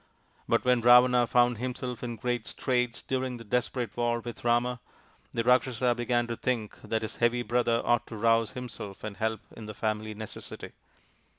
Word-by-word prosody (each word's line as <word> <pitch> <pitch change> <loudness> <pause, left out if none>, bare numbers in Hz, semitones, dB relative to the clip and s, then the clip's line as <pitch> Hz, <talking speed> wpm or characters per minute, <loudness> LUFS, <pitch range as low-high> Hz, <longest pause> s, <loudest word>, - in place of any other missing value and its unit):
But - - +2
when 125 -1 +4
Ravana 125 0 +6
found 120 -2 +3
himself 125 -1 -4
in 120 -1 -3
great 120 0 -2
straits 125 -2 -1
during 130 -1 -2
the 115 - -10
desperate 125 +2 -2
war 120 0 +1
with 120 -1 -8
Rama, 120 +1 +1 0.5
the 115 - -1
Rakshasa 125 0 +3
began 120 0 0
to 120 0 -4
think 115 -3 -3
that 110 0 -2
his 110 - -5
heavy 120 +1 +2
brother 120 -1 +1
ought 120 0 +2
to 110 - -7
rouse 115 0 +2
himself 120 -6 -7
and 105 -2 -6
help 110 -1 -1
in 110 -2 -9
the 105 - -7
family 110 0 -2
necessity. 110 0 -8
120 Hz, 175 wpm, -29 LUFS, 115-125 Hz, 0.5 s, Ravana